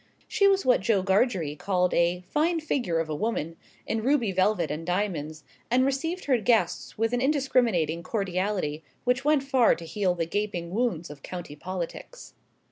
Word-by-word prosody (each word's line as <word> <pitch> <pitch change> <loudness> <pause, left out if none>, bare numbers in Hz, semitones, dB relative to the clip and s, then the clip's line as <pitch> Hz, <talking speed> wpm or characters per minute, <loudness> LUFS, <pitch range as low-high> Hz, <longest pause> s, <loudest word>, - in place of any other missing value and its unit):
She 400 - +3
was 390 0 +3
what 250 -5 +4
Joe 195 -2 +2
Gargery 190 - +1
called 180 +2 0
a 175 +1 +2
"fine 330 +3 +1
figure 250 - -1
of 165 - -1
a 155 - -3
woman," 165 -3 -2 0.3
in 225 - -1
ruby 245 -4 +2
velvet 185 -2 +1
and 155 +2 -4
diamonds, 165 -4 -2 0.3
and 255 +2 +3
received 325 +7 -2
her 260 -4 +3
guests 225 +1 +1
with 225 +2 0
an 245 - +1
indiscriminating 245 - +1
cordiality 185 -5 -2 0.2
which 250 +2 +1
went 295 -1 +3
far 265 -4 +4
to 165 - -9
heal 180 +2 0
the 170 -1 -1
gaping 175 -2 -3
wounds 195 - -1
of 145 -1 -12
county 175 -4 -7
politics. 185 - -7
200 Hz, 170 wpm, -27 LUFS, 170-250 Hz, 0.3 s, what